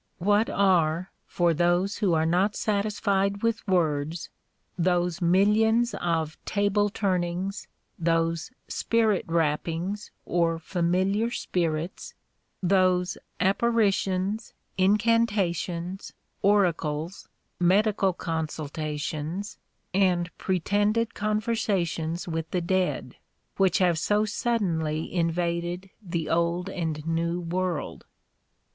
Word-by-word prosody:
What 205 +4 +2
are 180 -3 +2 0.2
(for 175 -1 +2
those 175 +4 +1
who 190 -6 +2
are 160 0 +2
not 185 +5 +2
satisfied 200 -1 0
with 230 -1 0
words) 160 -3 0 0.4
those 175 0 +1
mil 185 +4 +4
lions 225 +2 +3
of 165 -5 -2
table 205 0 +1
turnings, 185 -1 -2 0.3
those 165 +1 0 0.2
spirit 220 -4 +1
rappings 165 +5 -1 0.2
or 170 -1 +1
familiar 185 +6 0
spirits, 170 -6 -3 0.5
those 185 -1 +3 0.2
apparitions, 200 -1 +1 0.2
incan 215 +5 +3
tations, 180 -2 -3 0.3
oracles, 175 -4 +1 0.3
medical 195 +2 +3
consultations, 155 +2 -4 0.3
and 180 -2 +1
pretended 205 +5 +1
conversations 205 -6 -1
with 160 -1 -3
the 180 - 0
dead, 185 +1 -1 0.4
which 190 -2 +3
have 175 -5 +2
so 210 +5 +2
suddenly 170 -9 -1
invaded 175 +2 -1
the 170 -5 -3
old 170 +3 0
and 160 -4 -3
new 165 +1 0
world 175 -1 -3
180 Hz, 95 wpm, -26 LUFS, 165-200 Hz, 0.5 s, mil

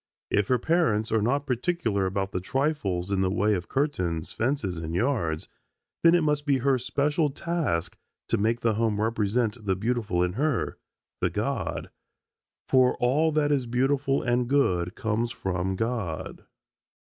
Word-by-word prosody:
If 105 -1 +2
her 125 - +3
parents 120 -7 +1
are 110 -1 +2
not 140 +6 +1
particular 125 - 0
about 95 +1 -2
the 90 - -2
trifles 100 - -1
in 95 -1 +1
the 95 - +2
way 105 +3 +2
of 90 -3 -3
curtains, 90 - -1
fences, 110 - -1
and 80 0 -4
yards, 90 - 0 0.5
then 170 +1 +6
it 170 - +3
must 150 -1 +1
be 140 -2 +4
her 130 0 +2
special 145 +5 +1
task 150 - -2 0.3
to - - +1
make 115 +3 +1
the 115 -2 +2
home 110 -1 0
represent 110 +1 0
the 95 -2 +1
beautiful 105 -4 0
in 90 0 -1
her, 140 +2 -1 0.4
the - - +1
God, - - -3 0.8
for 130 -1 +4
all 145 +6 +2
that 145 -1 +2
is 135 -4 +1
beautiful 135 +3 +1
and 120 0 +1
good 90 -11 +1
comes 115 +2 -1
from 95 -2 -2
God. 110 -7 -3
115 Hz, 160 wpm, -26 LUFS, 95-140 Hz, 0.8 s, then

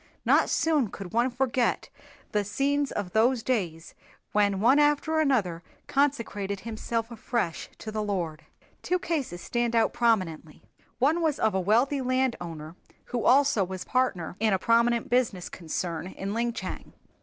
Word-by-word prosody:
Not - - +4
soon 305 -7 +2
could 195 -2 -9
one 240 +3 +3
forget 250 -1 0 0.4
the 210 -1 +1
scenes 275 +7 0
of 190 -3 -4
those 230 +3 +2
days 175 -11 -2 0.4
when 205 -2 +2
one 250 +7 +5
after 295 +2 +2
another 215 - +1 0.2
consecrated 220 -9 -1
himself 230 +1 -3
afresh 230 -6 -3
to 215 - -7
the 215 0 -2
Lord. 180 -7 -3 0.4
Two 365 - 0
cases 285 - -3
stand 240 -1 -1
out 225 - +3
prominently. 185 -10 0 0.3
One 305 +7 +2
was 315 -3 +2
that - - -5
of 220 - +2
a 190 - +1
wealthy 240 +9 +2
landowner 180 -12 -2 0.4
who 240 - 0
also 270 -5 +4
was 185 0 -5
partner 225 -11 0
in 215 -1 +2
a - - +3
prominent 235 +3 +2
business 235 -7 0
concern 170 0 -4
in 195 +1 -5
Linchang. 235 +1 -3
230 Hz, 150 wpm, -27 LUFS, 190-260 Hz, 0.4 s, one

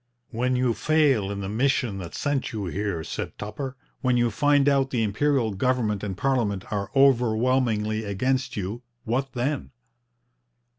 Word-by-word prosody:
'When 125 +2 0
you 125 -1 +2
fail 140 -5 +2
in 100 0 -4
the 95 - -3
mission 115 -1 0
that 85 -3 -7
brought 145 -2 0
you 105 -3 -4
here,' 95 -2 -2
said - - -5
Tupper; 130 +6 -5 0.2
'when 125 -2 +2
you 120 -1 +2
find 145 +3 +3
out 135 -1 +3
the 120 -4 0
Imperial 115 +2 +1
government 110 -1 0
and 95 -3 -4
parliament 115 -8 0
are 100 -1 -2
overwhelmingly 120 -4 +3
against 130 +7 -1
you 100 +4 -4 0.2
what 130 +3 -1
then?' 130 +3 -2
120 Hz, 150 wpm, -25 LUFS, 105-135 Hz, 0.2 s, find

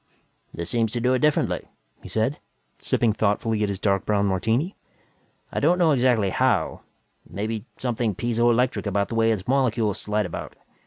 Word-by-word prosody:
"This 85 0 -6
seems 115 0 0
to 120 - -1
do 125 +2 +2
it 130 - +2
differently," 150 +1 +1 0.3
he - - -10
said, 115 +6 0 0.4
sipping 115 -3 +1
thoughtfully 110 +1 0
at 105 - +1
his 100 -2 -3
dark 100 -2 +1
brown 100 -1 +1
martini. 110 - 0 0.8
"I - - -1
don't 170 +5 +3
know 170 -3 +4
exactly 120 -7 +2
how 125 -4 +1 0.5
maybe 110 +2 -4
something 120 -4 -1
piezo 120 +2 +1
electric 120 -1 +1
about 100 0 0
the 115 - -4
way 115 0 +3
its 105 -4 -3
molecules 120 -6 +1
slide 105 0 -1
about. 85 - -6
115 Hz, 170 wpm, -24 LUFS, 105-125 Hz, 0.8 s, know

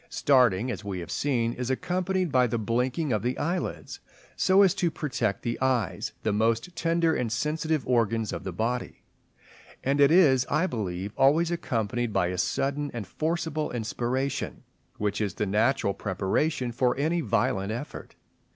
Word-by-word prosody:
Starting, 125 -4 +3
as 105 -1 -6
we 100 -2 -4
have 85 -3 -6
seen, 120 -5 0
is 125 0 -4
accompanied 180 +5 -1
by 125 -1 +4
the 120 - -1
blinking 125 +6 0
of 105 - 0
the 125 +3 -1
eyelids 175 +3 -3 0.4
so 190 +1 +5
as 190 - +4
to 175 - 0
protect 130 -10 -2
the 115 +1 -3
eyes, 120 -9 0
the 110 - +1
most 115 +10 0
tender 165 -1 +1
and 120 -6 -1
sensitive 150 +3 -1
organs 115 -3 +1
of - - -5
the 95 - -4
body; 115 +7 -3 0.8
and 140 +2 +1
it 140 - +7
is, 150 -7 +5
I 155 +5 +2
believe, 100 - -4
always 160 +5 +3
accompanied 120 - -1
by 90 -3 +1
a 90 0 -3
sudden 140 +9 -1
and 115 -4 -4
forcible 160 - -2
inspiration, 125 +4 -2 0.3
which 105 0 -1
is 100 -4 -2
the 105 - -1
natural 105 +2 +1
preparation 120 - -1
for 125 +1 +1
any 160 +5 +1
violent 105 -6 0
effort. 120 +6 -7
125 Hz, 160 wpm, -27 LUFS, 110-150 Hz, 0.8 s, it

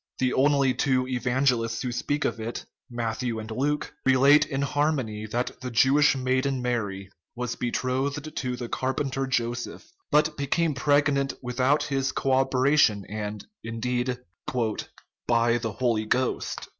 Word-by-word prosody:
The 130 -1 +1
only 140 -1 +3
two 130 -2 +1
evangelists 125 -2 0
who 125 - -2
speak 145 +5 -1
of - - -1
it, 115 +2 -5 0.2
Matthew 120 0 -2
and 110 0 -6
Luke, 145 +6 -1
relate 135 +3 +5
in 140 -1 -2
harmony 135 -8 -1
that 120 +3 -3
the 130 - -4
Jewish 135 +5 +4
maiden 130 +1 0
Mary 100 -6 -3 0.2
was 125 0 -3
betrothed 135 +5 -2
to 125 -1 -2
the 120 -1 -5
carpenter 135 +2 -2
Joseph, 120 - -3 0.2
but 150 +1 +3
became 150 +3 +1
preg 145 +2 +3
nant 140 0 0
without 130 +4 +1
his 135 -1 -1
co 135 - -1
operation, 130 -5 +3
and, 105 0 -5 0.2
indeed, 125 +2 -2 1.1
"by 120 0 +3
the 115 -3 -3
Holy 115 -2 0
Ghost." 130 +3 -1
130 Hz, 140 wpm, -26 LUFS, 120-140 Hz, 1.1 s, relate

